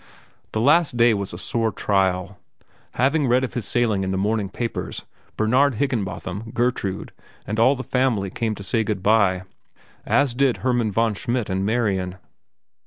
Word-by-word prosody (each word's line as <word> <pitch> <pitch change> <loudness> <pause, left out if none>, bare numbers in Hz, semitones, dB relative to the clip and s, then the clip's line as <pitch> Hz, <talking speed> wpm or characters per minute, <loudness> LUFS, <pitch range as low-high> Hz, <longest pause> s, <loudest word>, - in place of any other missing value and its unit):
The 110 - 0
last 145 0 +3
day 115 -1 +5
was 100 -2 -3
a 85 - -7
sore 115 +3 -1
trial. 95 -1 0 0.5
Having 140 +3 +2
read 125 +2 +3
of 130 - -3
his 120 -5 -3
sailing 110 -5 +1
in 95 - -2
the 95 - -1
morning 105 0 0
papers, 115 +4 -4 0.3
Bernard 125 +5 +3
Higginbotham, 105 -4 -3
Gertrude, 120 -6 -1 0.3
and 110 +1 -3
all 130 +5 +5
the 130 - -5
family 125 -9 0
came 110 0 -2
to 100 - -8
say 110 +3 0
good 105 -3 -3
by, 100 -4 +3 0.6
as 140 -3 +2
did 130 0 +2
Hermann 120 -4 +1
von 115 +2 +1
Schmidt 120 +1 -2
and 95 +1 -1
Marian. 100 -6 0
110 Hz, 165 wpm, -23 LUFS, 100-125 Hz, 0.6 s, day